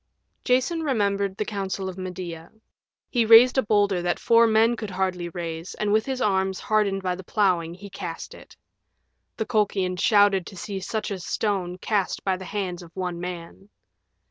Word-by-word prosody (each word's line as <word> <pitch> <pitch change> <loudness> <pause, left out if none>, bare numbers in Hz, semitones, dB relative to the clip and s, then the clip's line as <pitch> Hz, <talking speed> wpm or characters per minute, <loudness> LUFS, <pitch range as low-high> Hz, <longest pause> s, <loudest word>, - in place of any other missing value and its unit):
Jason 260 +7 +1
remembered 200 -8 0
the 210 - -1
counsel 195 -2 -3
of 185 - -5
Medea. 180 -3 -7 0.6
He 240 -2 +3
raised 230 +4 +7
a - - +4
boulder 205 -4 +2
that 175 0 0
four 230 0 +5
men 225 +2 +4
could 215 -2 -6
hardly 185 -2 -2
raise 170 -1 -6
and 210 -1 0
with 220 +3 +2
arms 190 -5 +1
hardened 200 -3 0
by 180 -1 0
the 185 +1 -8
plowing 175 -4 +1
he 200 +2 -10
cast 170 -3 -6
it. - - -15 0.8
The 220 - -1
Colchians 195 -5 0
shouted 205 -3 +4
to 190 - -10
see 200 0 -5
such 215 +2 -3
a 195 - -3
stone 180 -1 -2
cast 200 0 -1
by 190 -1 +1
the 185 0 -8
hands 185 -4 -4
of 170 - -12
one 180 -2 -3
man. 180 +2 -7
195 Hz, 170 wpm, -25 LUFS, 180-215 Hz, 0.8 s, raised